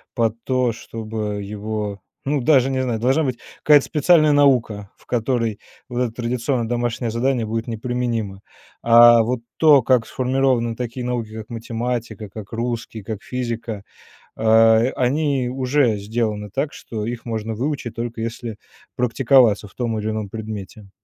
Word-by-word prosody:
под 115 Hz, -1 st, 0 dB
то, 130 Hz, -2 st, +1 dB
чтобы 110 Hz, -2 st, -5 dB
его, 105 Hz, 0 st, -4 dB, 0.2 s
ну, 145 Hz, +1 st, 0 dB
даже 135 Hz, 0 st, +4 dB
не 130 Hz, -1 st, 0 dB
знаю, 120 Hz, -4 st, -2 dB
должна 135 Hz, +6 st, +2 dB
быть 125 Hz, -3 st, -3 dB, 0.2 s
какая-то 145 Hz, -2 st, +6 dB
специальная 155 Hz, 0 st, +4 dB
наука, 125 Hz, -8 st, +2 dB
в -, -, -26 dB
которой 115 Hz, -2 st, -1 dB, 0.3 s
вот 120 Hz, -1 st, -3 dB
это 115 Hz, -3 st, -3 dB
традиционное 120 Hz, 0 st, -1 dB
домашнее 120 Hz, -1 st, -1 dB
задание 120 Hz, +1 st, 0 dB
будет 115 Hz, +1 st, -3 dB
не 115 Hz, -, -3 dB
применимо. 115 Hz, -4 st, -3 dB, 0.4 s
А 120 Hz, 0 st, +7 dB
вот 120 Hz, +1 st, -2 dB, 0.2 s
то, 150 Hz, -4 st, +6 dB
как 125 Hz, -2 st, +2 dB
сформированы 130 Hz, -3 st, 0 dB
такие 125 Hz, 0 st, -4 dB
науки, 120 Hz, -3 st, -3 dB
как 110 Hz, 0 st, -8 dB
математика, 115 Hz, -1 st, -4 dB
как 105 Hz, +2 st, -10 dB
русский, 115 Hz, -2 st, -4 dB
как 105 Hz, -1 st, -5 dB
физика, 115 Hz, -4 st, -4 dB, 0.5 s
а, 110 Hz, 0 st, +5 dB, 0.2 s
они 135 Hz, 0 st, +1 dB
уже 130 Hz, -2 st, +1 dB
сделаны 105 Hz, 0 st, -2 dB
так, 140 Hz, +2 st, -2 dB
что 110 Hz, -2 st, -6 dB
их 120 Hz, +1 st, -5 dB
можно 110 Hz, -1 st, -3 dB
выучить 125 Hz, -2 st, -3 dB
только 115 Hz, 0 st, -5 dB
если 115 Hz, -1 st, -5 dB, 0.4 s
практиковаться 120 Hz, -4 st, +3 dB
в -, -, -23 dB
том 115 Hz, -3 st, -2 dB
или 105 Hz, 0 st, -2 dB
ином 110 Hz, -1 st, -3 dB
предмете. 105 Hz, -1 st, -8 dB
115 Hz, 150 wpm, -21 LUFS, 110-125 Hz, 0.5 s, А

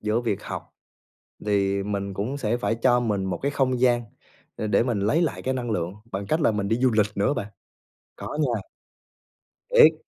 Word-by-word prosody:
giữa 110 Hz, +2 st, +1 dB
việc 115 Hz, -5 st, -2 dB
học, -, -, -7 dB, 0.7 s
thì 100 Hz, -1 st, +2 dB
mình 100 Hz, -1 st, -3 dB
cũng 115 Hz, +9 st, -2 dB
sẽ 115 Hz, -3 st, 0 dB
phải 120 Hz, -2 st, 0 dB
cho 125 Hz, +1 st, +3 dB
mình 105 Hz, -5 st, 0 dB
một 90 Hz, -2 st, -2 dB
cái 140 Hz, -, +1 dB
không 130 Hz, -3 st, +1 dB
gian 120 Hz, -2 st, +4 dB, 0.5 s
để 110 Hz, -, -2 dB
để 105 Hz, -, +3 dB
mình 120 Hz, -4 st, 0 dB
lấy 125 Hz, -, +2 dB
lại 160 Hz, -, -1 dB
cái 130 Hz, -, 0 dB
năng 120 Hz, -2 st, -3 dB
lượng, 90 Hz, -2 st, -1 dB, 0.2 s
bằng 100 Hz, +1 st, -3 dB
cách 155 Hz, -, +1 dB
là 145 Hz, -, +4 dB
mình 100 Hz, -2 st, -1 dB
đi 115 Hz, -, +2 dB
du 130 Hz, +1 st, +3 dB
lịch 110 Hz, -2 st, +3 dB
nữa 100 Hz, +8 st, +2 dB
bạn. 100 Hz, -, -3 dB, 0.7 s
Có 150 Hz, -, -6 dB
nha. 120 Hz, -8 st, +1 dB, 1.1 s
Thiệt. 160 Hz, -, +8 dB
115 Hz, 205 wpm, -25 LUFS, 100-130 Hz, 1.1 s, Thiệt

